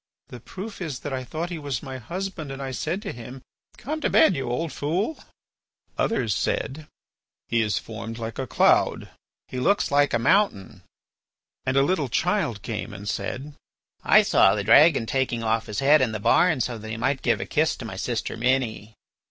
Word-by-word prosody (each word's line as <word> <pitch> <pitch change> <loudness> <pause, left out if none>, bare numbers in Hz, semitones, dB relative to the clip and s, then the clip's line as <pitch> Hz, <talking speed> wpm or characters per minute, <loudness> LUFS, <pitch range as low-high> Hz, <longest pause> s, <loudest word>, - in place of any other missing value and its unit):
The 125 - -9
proof 195 - -8
is 145 -8 -4
that 145 - -5
I 130 -1 -3
thought 160 +7 -5
he 170 - -4
was 140 -3 -4
my 130 -2 -6
husband, 170 - -5
and 135 - -7
I 135 -1 -4
said 165 - -3
to - - -4
him, 125 +2 -10 0.3
'Come 310 +4 -4
to - - +1
bed, 315 - +5
you 135 -4 -3
old 155 +4 -2
fool.'" 180 - -2 0.8
Others 115 - 0
said: 145 - -2 0.6
"He 115 - +2
is 105 -4 0
formed 115 0 -6
like 115 +1 -6
a 130 - -3
cloud." - - +2 0.4
"He 130 - -5
looks 200 +7 +2
like 145 -2 +3
a - - +4
mountain." 115 - +1 0.9
And 130 +1 +1
a 135 - +5
little 145 -3 0
child 120 - 0
came 105 -2 -5
and 100 +1 -8
said: 140 +7 -4 0.5
"I - - +6
saw 95 - +4
the 105 - -2
dragon 140 +4 +6
taking 120 -2 -1
off 115 0 0
his 105 +5 -3
head 150 +3 +5
in 120 -4 +1
the 110 - -3
barn 155 - +3
so 120 -1 -2
that 110 +1 -8
he 110 - -4
might 135 +4 0
give - - +1
a - - -3
kiss - - +1
to - - -8
my - - -6
sister - - -3
Minnie." 115 -3 -1
130 Hz, 195 wpm, -25 LUFS, 115-155 Hz, 0.9 s, I